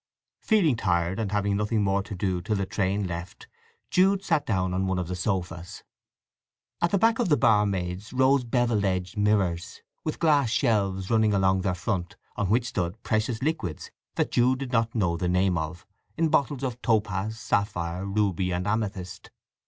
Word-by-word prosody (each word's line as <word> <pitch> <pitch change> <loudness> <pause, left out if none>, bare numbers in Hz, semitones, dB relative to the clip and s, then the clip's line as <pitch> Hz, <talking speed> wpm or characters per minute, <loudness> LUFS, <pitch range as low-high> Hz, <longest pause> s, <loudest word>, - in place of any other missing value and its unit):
Feeling 190 - +3
tired, 90 -2 0
and 105 -3 -2
having 100 -1 +1
nothing 105 +1 0
more 100 0 +1
to 100 +1 -7
do 90 -1 -1
till 105 +4 -1
the 100 -1 -1
train 100 +1 -1
left, 85 0 -7 0.4
Jude 195 +2 +3
sat 165 -6 0
down 95 -4 0
on 95 +1 0
one 95 0 0
of 90 -2 -2
the 90 - -3
sofas. 90 -2 -3 1.0
At 170 - +3
the 200 - +2
back 225 +4 +3
of 235 - +1
the 150 - +4
barmaids 100 -3 +1
rose 130 +1 +3
bevel 120 -3 +1
edged 95 0 -1
mirrors, 100 -5 0 0.2
with 155 - -3
glass 150 -7 +3
shelves 100 -6 0
running 110 -2 +3
along 95 -1 +2
their 90 -1 0
front, 90 -2 -3 0.2
on 100 -2 -1
which 115 +3 +2
stood 100 0 -3
precious 110 +2 -1
liquids 105 - -3 0.2
that - - 0
Jude 125 +2 +3
did 130 -2 -5
not 115 -1 +1
know 90 -6 +1
the 90 +1 -1
name 90 0 +2
of, 80 +2 -4 0.3
in 165 -1 +2
bottles 140 -3 +1
of 125 -2 -3
topaz, 105 -1 0
sapphire, 95 -6 -1
ruby 100 -2 0
and 90 +1 -2
amethyst. 105 -4 -3
100 Hz, 175 wpm, -26 LUFS, 95-120 Hz, 1.0 s, the